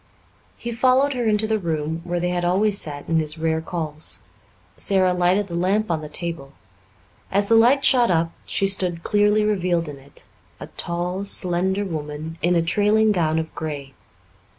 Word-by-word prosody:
He 235 - -6
followed 260 +4 +2
her 245 -2 -3
into 215 0 +1
the 220 0 0
room 160 -2 -3
where 175 0 -3
they 175 +1 -1
had 175 0 -2
always 200 +3 +3
sat 145 -2 -4
in 165 -1 +1
his 155 0 -2
rare 160 0 -1
calls. 160 -2 -4 0.5
Sara 185 -2 +1
lighted 180 +3 +1
the 180 - -10
lamp 190 +4 0
on 160 -2 -1
the 150 - -8
table. 165 -4 -5 0.8
As 200 +1 +2
the 230 - +2
light 250 +5 +4
shot 245 -3 +5
up 165 -1 +1 0.2
she 195 - +1
stood 180 -3 +1
clearly 210 0 +2
revealed 180 -5 0
in 145 -2 -9
it 135 +1 -12 0.4
a - - -7
tall, 175 +3 -3
slender 190 +1 +3
woman 155 -1 -6
in 175 +1 +1
a 170 - +2
trailing 210 +5 +3
gown 160 -5 0
of 160 0 -4
grey. 145 -4 -6
175 Hz, 175 wpm, -22 LUFS, 160-205 Hz, 0.8 s, shot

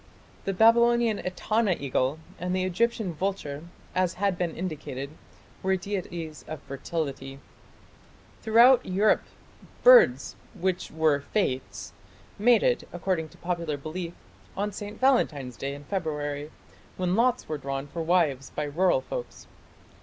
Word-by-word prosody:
The 195 - 0
Babylonian 235 +1 +4
Etana 200 +2 0
eagle 135 +1 0 0.2
and 180 +2 -2
the 185 - 0
Egyptian 200 0 0
vulture, 160 -4 -3 0.3
as 185 -1 +1
has 200 0 +1
been 175 -2 -3
indicated, 150 -6 -5 0.5
were 190 0 +2
deities 175 -4 -5
of 155 -1 -6
fertility. 140 -1 -4 1.0
Throughout 235 +3 +6
Europe 200 +4 +2 0.6
birds, - - +6 0.2
which 185 -1 -1
were 155 -2 +2
"Fates", 140 -6 -2 0.5
mated, 245 - +3
according 165 -5 -2
to - - -19
popular 170 -4 -2
belief, 170 +4 -5 0.4
on 205 +1 -1
St. 205 +1 -8
Valentine's 150 - +2
Day 135 +4 -4
in 145 - -11
February, 150 -4 -3 0.5
when 180 0 0
lots 245 +2 +2
were 155 -1 -3
drawn 135 0 -4
for 145 +4 -6
wives 160 -6 +1
by 150 - -3
rural 175 - +2
folks. - - -7
180 Hz, 125 wpm, -27 LUFS, 150-205 Hz, 1.0 s, Throughout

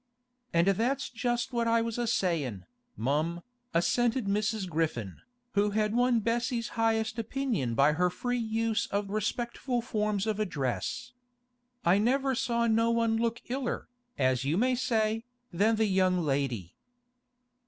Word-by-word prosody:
'And 170 0 +3
that's 230 +8 +1
just 240 +1 -1
what 235 -1 +1
I 230 0 +3
was 230 +1 -3
a 240 - 0
sayin', 160 - -1 0.3
mum,' 155 +8 -1 0.3
assented 240 +7 +1
Mrs. 210 0 0
Griffin, 155 - -2 0.3
who 205 0 +3
had 215 0 +1
won 245 -1 +3
Bessie's 235 +1 -1
highest 225 0 0
opinion 225 - -1
by 140 +4 +4
her 180 +3 +2
free 245 +6 -2
use 225 -1 0
of 200 0 -2
respectful 240 +4 -1
forms 215 -4 -1
of 215 -1 -1
address. 175 - -2 0.7
'I 180 +4 +5
never 265 +4 +2
saw 235 -2 0
no 230 0 +3
one 230 -1 +2
look 235 +1 -1
iller, 255 0 -3 0.3
as 130 -2 +2
you 145 +5 0
may 255 +4 +3
say, 225 -3 0 0.3
than 210 +6 +3
the 220 0 +2
young 185 -2 +2
lady. 135 - -1
220 Hz, 145 wpm, -29 LUFS, 175-235 Hz, 0.7 s, I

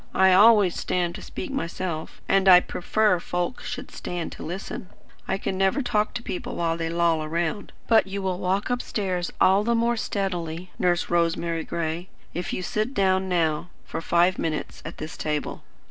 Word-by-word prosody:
I 190 0 +6
always 205 -2 +6
stand 175 -1 -1
to - - -8
speak 350 - -6
myself, 170 -8 -4
and 195 0 +4
I 180 -1 +10
prefer 185 +1 +1
folk 175 +7 -3
should 250 0 -6
stand 175 -2 -5
to - - -10
listen. 180 +1 -6 0.4
I - - 0
can 190 -1 -3
never 195 +9 +2
talk 215 -3 0
to 240 - -3
people 180 - -5
while 165 -1 0
they 165 -1 -2
loll 170 -2 +2
around. 170 +5 -2
But 225 -3 +4
you 195 0 -4
will 185 -1 -1
walk 195 +6 0
upstairs 190 -7 -2
all 190 +2 +5
the 235 +2 +2
more 235 +1 +2
steadily, 180 -5 -3
Nurse 175 -1 +1
Rosemary 170 -1 +1
Gray, 170 +2 -3 0.2
if 175 +1 -3
you 185 - -3
sit 215 +8 -2
down 190 -1 +2
now 165 -1 +1 0.2
for 165 - -5
five 175 +3 +3
minutes 155 -2 -3
at 165 - -7
this 155 +1 -6
table." 150 -1 -3
180 Hz, 175 wpm, -25 LUFS, 170-200 Hz, 0.4 s, I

